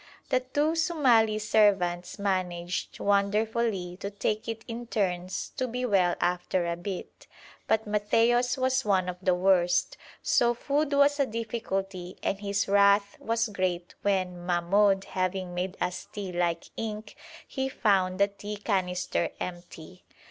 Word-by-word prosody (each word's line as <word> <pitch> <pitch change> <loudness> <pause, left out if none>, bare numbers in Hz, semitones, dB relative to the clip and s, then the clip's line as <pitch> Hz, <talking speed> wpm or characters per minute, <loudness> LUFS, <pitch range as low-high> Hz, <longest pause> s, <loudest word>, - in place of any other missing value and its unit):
The 255 - +3
two 290 +5 0
Somali 260 -10 +3
servants 195 -5 +2
managed 185 -3 -2
wonderfully 205 -2 0
to 200 - -5
take 210 +2 -2
it 225 -1 -5
in 235 0 -6
turns 185 -5 -2
to 255 - 0
be 250 +1 -3
well 185 -6 +3
after 180 0 0
a 170 0 -1
bit, 180 +2 -7 0.4
but 220 +1 +2
Matthaios 230 +4 +2
was 260 0 +1
one 190 -4 +2
of 180 0 -4
the 185 -2 +2
worst, 180 -1 +2 0.3
so 240 0 +3
food 290 +4 0
was 285 +1 +4
a 280 - +3
difficulty 195 -5 -4
and 195 - -1
his 200 0 -1
wrath 200 0 +4
was 230 +1 0
great 180 -3 -2
when, 185 -3 -1
Mahmoud 190 +3 +2
having 185 -1 -2
made 180 +2 -3
us 180 - -3
tea 200 -3 -5
like 175 -1 -1
ink, 215 -1 -5 0.3
he 265 -1 -2
found 190 -6 +1
the 200 - +5
tea 205 +1 -7
canister 180 -3 -1
empty. 175 0 -8
200 Hz, 140 wpm, -28 LUFS, 180-225 Hz, 0.4 s, the